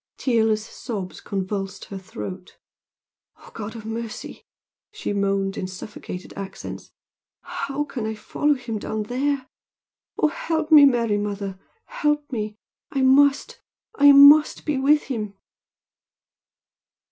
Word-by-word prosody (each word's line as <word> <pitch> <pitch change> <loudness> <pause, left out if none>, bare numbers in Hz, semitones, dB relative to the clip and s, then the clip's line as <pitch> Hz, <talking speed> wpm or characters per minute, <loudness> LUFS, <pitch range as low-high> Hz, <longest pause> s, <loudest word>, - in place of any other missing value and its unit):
Tearless 220 -4 +1
sobs 210 -6 -6
convulsed 195 0 -4
her 195 - -7
throat, 190 -2 -8 0.8
"Oh, - - -16
God 220 +1 -7
of 220 -2 -9
mercy!" 225 0 -6 0.4
she 425 - -4
moaned 195 -1 0
in 185 - -3
suffocated 185 -1 -8
accents 195 -1 -8 0.5
"How 275 +1 -3
can 245 -6 -5
I 220 - -3
follow 290 +7 0
him 235 -4 -5
down 215 +1 -3
there! 265 +4 -1 0.7
Oh, 310 - +3
help 320 +1 -2
me, 295 -2 +10
Mary 235 -6 +2
mother! 200 -2 -4 0.3
Help 295 - -1
me! 215 -3 -4 0.3
I 270 -3 -1
must 280 +2 +3 0.3
I 285 0 +7
must 285 +2 +7
be 295 -3 0
with 295 +3 +4
him!" 215 -6 -4
225 Hz, 125 wpm, -23 LUFS, 205-280 Hz, 0.8 s, me